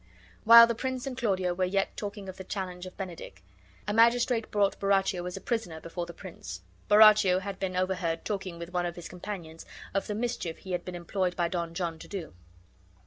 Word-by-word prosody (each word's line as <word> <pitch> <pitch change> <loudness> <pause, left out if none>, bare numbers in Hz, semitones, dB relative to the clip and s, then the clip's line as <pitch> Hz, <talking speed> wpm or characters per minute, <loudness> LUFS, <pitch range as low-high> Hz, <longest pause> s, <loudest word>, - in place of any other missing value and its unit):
While 230 +1 +11
the 235 - -1
prince 260 +2 -3
and 270 -2 -4
Claudio 190 -7 0
were 185 +1 -1
yet 195 +2 0
talking 205 -1 -6
of 190 0 -8
the 190 - -7
challenge 185 -2 -5
of 185 - -12
Benedick 170 - -8 0.4
a 205 - 0
magistrate 235 0 +3
brought 205 -1 +1
Borachio 195 -2 +1
as 180 - -5
a - - -8
prisoner 220 -8 -3
before 170 +1 -5
the - - -7
prince. 165 - -9 0.3
Borachio 210 -3 +7
had 195 0 -6
been 185 -1 -2
overheard 180 -3 -1
talking 190 -4 -3
with 170 +1 -8
one 175 -1 0
of 170 - -6
his 175 - -8
companions 175 -3 -7 0.3
of 195 - -1
the 210 - -3
mischief 215 -7 -3
he 190 - -9
had 175 -1 -1
been 180 - -6
employed 180 +1 -2
by 175 -1 +1
Don 170 -2 -3
John 170 -3 -3
to - - -10
do. 185 - -6
190 Hz, 205 wpm, -29 LUFS, 175-205 Hz, 0.4 s, While